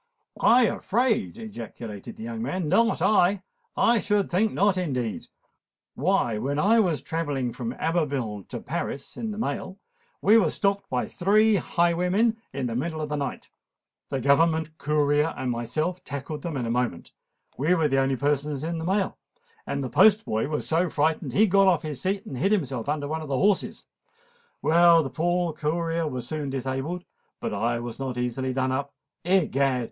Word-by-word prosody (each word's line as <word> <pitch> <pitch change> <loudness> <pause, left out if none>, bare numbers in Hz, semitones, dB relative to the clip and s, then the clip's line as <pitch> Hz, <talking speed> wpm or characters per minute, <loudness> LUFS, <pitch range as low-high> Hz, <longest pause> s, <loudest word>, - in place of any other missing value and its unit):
"I 245 +2 +6
afraid!" 230 +1 0
ejaculated 115 - -8
the 220 - -9
young 230 -1 -5
man; 185 -7 -2
"not 230 +8 +2
I! 195 -2 +3 0.3
I 235 0 +4
should 205 -1 0
think 210 +5 +2
not, 200 0 +2
indeed! 130 - -2 0.7
Why, 140 - +1
when 140 +5 -2
I 215 +8 +4
was 175 -8 +1
travelling 145 -7 -2
from 120 -1 -4
Abbeville 135 - -2
to - - -5
Paris 140 - -5
in 225 - -4
the 210 - -5
mail, 190 -4 -3 0.4
we 215 +3 +6
were 180 -7 +2
stopped 200 +2 0
by 125 -1 -1
three 210 +3 +3
highwaymen 180 +6 +1 0.2
in 135 -1 -3
the 115 -2 -3
middle 160 +5 -2
of 155 -1 -3
the 150 - -1
night. 140 -1 -5 0.6
The 135 - -2
government 160 +4 +2
courier 150 +1 +1
and 130 - -2
myself 155 +10 -2
tackled 145 +2 -6
them 165 -3 -4
in 125 - -2
a 115 - -2
moment: 120 -7 -2 0.4
we 155 +7 +2
were 160 -3 +2
the 135 -1 +2
only 135 0 +1
persons 145 +1 -1
in 165 +1 -3
the - - -4
mail, 190 +2 0 0.5
and 140 0 -2
the - - -2
postboy 190 - +4
was 150 0 -3
so 170 +2 +2
frightened 155 +2 0
that - - -2
he 215 - +6
got 195 -1 +4
off 175 -5 +3
his 150 -4 -5
seat 195 +1 -1
and 130 - -6
hid 195 - +2
himself 140 - -1
under 145 -1 -1
one 160 +2 -3
of 155 - -7
the 135 - 0
horses. 200 +4 +1 0.8
Well, 170 0 +6
the 135 - -5
poor 175 0 0
courier 165 +2 -1
was 125 -4 -4
soon 150 -1 -3
disabled; 135 +7 -3 0.3
but - - -3
I 120 +1 0
was 120 +1 -7
not 130 -2 -4
easily 125 +2 -2
done 130 0 0
up. 140 +2 -3 0.3
Egad! 140 -8 +2
155 Hz, 180 wpm, -26 LUFS, 135-190 Hz, 0.8 s, I